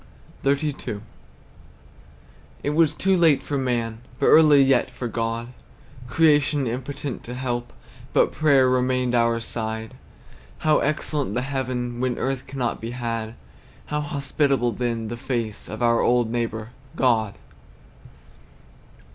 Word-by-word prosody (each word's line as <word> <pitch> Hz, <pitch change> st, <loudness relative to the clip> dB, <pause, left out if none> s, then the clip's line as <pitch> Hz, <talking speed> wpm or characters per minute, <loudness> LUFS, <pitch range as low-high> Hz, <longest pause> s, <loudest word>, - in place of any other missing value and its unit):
XXXII. 140 Hz, -6 st, -1 dB, 1.6 s
It 145 Hz, -, 0 dB
was 155 Hz, 0 st, +3 dB
too 190 Hz, +3 st, +2 dB
late 160 Hz, -6 st, +4 dB
for 145 Hz, -, -3 dB
man, 120 Hz, -3 st, -1 dB, 0.2 s
But -, -, +3 dB
early 150 Hz, -3 st, +7 dB
yet 135 Hz, -1 st, +3 dB
for 125 Hz, -, -5 dB
God; 115 Hz, +1 st, -3 dB, 0.6 s
Creation 145 Hz, 0 st, +3 dB
impotent 135 Hz, +3 st, -4 dB
to 120 Hz, -, -6 dB
help, 120 Hz, -2 st, -3 dB, 0.4 s
But -, -, +3 dB
prayer 140 Hz, -3 st, +4 dB
remained 125 Hz, -1 st, +1 dB
our 115 Hz, -1 st, +2 dB
side. 110 Hz, -1 st, -4 dB, 0.7 s
How 155 Hz, -1 st, +5 dB
excellent 145 Hz, -5 st, -1 dB
the 125 Hz, -, 0 dB
heaven, 125 Hz, -3 st, -3 dB
When 125 Hz, -1 st, -1 dB
earth 135 Hz, -1 st, -2 dB
cannot 130 Hz, -3 st, -3 dB
be 115 Hz, -, -4 dB
had; 115 Hz, -2 st, -3 dB, 0.6 s
How 150 Hz, -, +1 dB
hospitable, 140 Hz, -3 st, 0 dB
then, 115 Hz, 0 st, -2 dB
the 120 Hz, +2 st, -5 dB
face 115 Hz, -4 st, -4 dB
Of 110 Hz, +3 st, -4 dB
our 115 Hz, -1 st, +3 dB
old 120 Hz, -2 st, +2 dB
neighbor, 115 Hz, -1 st, -3 dB, 0.2 s
God! 110 Hz, -5 st, +2 dB
125 Hz, 125 wpm, -24 LUFS, 115-140 Hz, 1.6 s, early